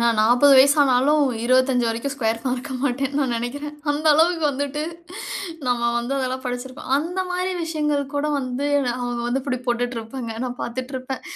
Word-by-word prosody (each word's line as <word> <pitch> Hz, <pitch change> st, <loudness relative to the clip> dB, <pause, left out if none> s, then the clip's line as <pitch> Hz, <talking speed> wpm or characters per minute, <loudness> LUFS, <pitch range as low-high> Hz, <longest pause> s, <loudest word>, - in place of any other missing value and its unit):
நான் 235 Hz, -2 st, +2 dB
40 245 Hz, +6 st, +5 dB
வயசு 280 Hz, +3 st, +6 dB
ஆனாலும், 280 Hz, +3 st, +3 dB, 0.2 s
25 255 Hz, 0 st, +3 dB
வரைக்கும் 230 Hz, +5 st, -2 dB
ஸ்க்யர் 225 Hz, -4 st, 0 dB
மறக்க 255 Hz, +1 st, -2 dB
மாட்டேன்னு 275 Hz, +1 st, 0 dB
நான் 250 Hz, -4 st, 0 dB
நினைக்குறேன். 285 Hz, +6 st, -4 dB, 0.2 s
அந்த 295 Hz, +2 st, -1 dB
அளவுக்கு 330 Hz, +1 st, +3 dB
வந்துட்டு 285 Hz, +2 st, -3 dB, 0.9 s
நம்ம 245 Hz, -1 st, +1 dB, 0.2 s
வந்து 240 Hz, +3 st, -3 dB
அதெல்லாம் 260 Hz, 0 st, -2 dB
படிச்சிருப்போம். 250 Hz, +1 st, -6 dB
அந்த 345 Hz, +6 st, -2 dB
மாதிரி 365 Hz, +1 st, -1 dB
விஷயங்கள் 300 Hz, -3 st, 0 dB
கூட 285 Hz, +1 st, 0 dB
வந்து 260 Hz, +1 st, -2 dB, 0.3 s
அவங்க 245 Hz, -1 st, -3 dB
வந்து 255 Hz, +2 st, -1 dB
இப்படி 255 Hz, -2 st, -2 dB
போட்டுட்டு 245 Hz, 0 st, -1 dB
இருப்பாங்க. 230 Hz, +1 st, -6 dB
நான் 250 Hz, -1 st, -5 dB
பாத்துட்டு 255 Hz, +3 st, -5 dB
இருப்பேன். 260 Hz, +1 st, -5 dB
260 Hz, 165 wpm, -22 LUFS, 245-285 Hz, 0.9 s, வயசு